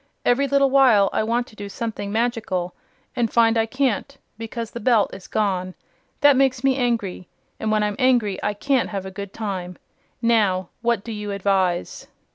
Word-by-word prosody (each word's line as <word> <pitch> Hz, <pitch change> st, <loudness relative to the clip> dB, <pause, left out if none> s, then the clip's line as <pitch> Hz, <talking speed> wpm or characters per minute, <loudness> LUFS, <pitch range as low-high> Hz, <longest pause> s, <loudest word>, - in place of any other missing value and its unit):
Every 275 Hz, +3 st, +3 dB
little 275 Hz, 0 st, +3 dB
while 245 Hz, -8 st, +5 dB
I -, -, +1 dB
want 235 Hz, +2 st, 0 dB
to 220 Hz, -, -18 dB
do 205 Hz, -1 st, -7 dB
something 210 Hz, -2 st, -4 dB
magical, 220 Hz, -6 st, -1 dB, 0.4 s
and 235 Hz, -3 st, 0 dB
find 230 Hz, -1 st, +4 dB
I 225 Hz, 0 st, +2 dB
can't 265 Hz, +2 st, -1 dB, 0.2 s
because 225 Hz, 0 st, -6 dB
the 235 Hz, -, -6 dB
Belt 225 Hz, -2 st, +2 dB
is 185 Hz, -, -10 dB
gone. 185 Hz, -3 st, -1 dB, 0.5 s
That 290 Hz, -1 st, +6 dB
makes 260 Hz, -2 st, +2 dB
me 270 Hz, -1 st, +3 dB
angry, 230 Hz, -8 st, -2 dB, 0.3 s
and 220 Hz, -, -1 dB
when 215 Hz, -1 st, +2 dB
I'm 210 Hz, -1 st, -1 dB
angry 240 Hz, -7 st, +2 dB
I 210 Hz, -, -1 dB
can't 265 Hz, +4 st, 0 dB
have 195 Hz, -2 st, -4 dB
a 190 Hz, -, -6 dB
good 200 Hz, 0 st, -7 dB
time. 185 Hz, -5 st, -5 dB, 0.4 s
Now, 205 Hz, -6 st, +2 dB
what 235 Hz, -4 st, 0 dB
do 230 Hz, -, -7 dB
you 210 Hz, -1 st, -5 dB
advise?" 190 Hz, -3 st, -1 dB
220 Hz, 180 wpm, -22 LUFS, 200-245 Hz, 0.5 s, That